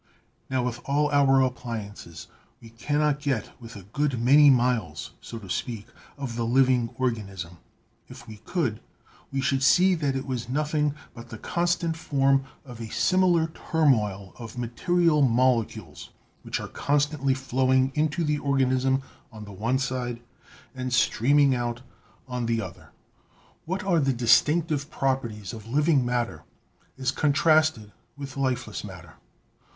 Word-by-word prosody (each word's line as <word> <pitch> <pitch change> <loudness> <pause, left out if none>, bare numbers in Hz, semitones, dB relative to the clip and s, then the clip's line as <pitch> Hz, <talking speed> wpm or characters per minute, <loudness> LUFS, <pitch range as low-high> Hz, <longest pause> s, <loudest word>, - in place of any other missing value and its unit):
"Now, 130 -1 0
with 120 -1 -3
all 145 +1 +1
our 135 -2 +4
appliances, 110 -9 -5 0.3
we 115 - -14
cannot 145 +5 0
get 135 -7 -2
with 115 -1 -10
a 100 - -10
good 135 +5 -1
many 140 +5 +6
miles, 120 - +1
so 115 - -8
to 105 -4 -10
speak, 110 +3 -4 0.3
of 135 -5 -5
the 120 - -1
living 125 0 +3
organism. 100 -9 -3 0.5
If 120 - -13
we 110 -1 -10
could, 115 - -2 0.5
we 135 0 -1
should 135 0 +1
see 185 +8 +5
that 145 -6 -1
it 135 - -3
was 125 -3 -4
nothing 150 +1 0 0.2
but 115 0 -11
the 110 - -8
constant 170 +3 -1
form 135 -3 +1 0.2
of 120 -3 -10
a 110 - -6
similar 180 -3 +3
turmoil 110 - 0
of 115 0 -9
material 150 +7 +1
molecules, 125 -2 0 0.3
which - - -3
are - - -6
constantly 145 -2 0
flowing 130 0 +1
into 155 +2 0
the 150 -1 0
organism 135 -1 +1 0.3
on 110 -1 -10
the 105 - -10
one 115 +7 0
side 125 -3 -3 0.5
and 130 -1 -4
streaming 135 +3 +3
out 120 0 -3 0.4
on 125 -2 -3
the 115 -1 +1
other." - - -8 0.8
What 185 +5 -3
are 180 -4 +2
the 135 -2 +1
distinctive 145 +6 +2
properties 120 - -2
of 110 -1 -9
living 145 +2 +2
matter 120 -1 -2 0.6
as 130 -1 0
contrasted 155 -6 +2 0.3
with 140 -2 -7
lifeless 125 -5 -2
matter? 90 -6 -10
130 Hz, 145 wpm, -26 LUFS, 115-145 Hz, 0.8 s, many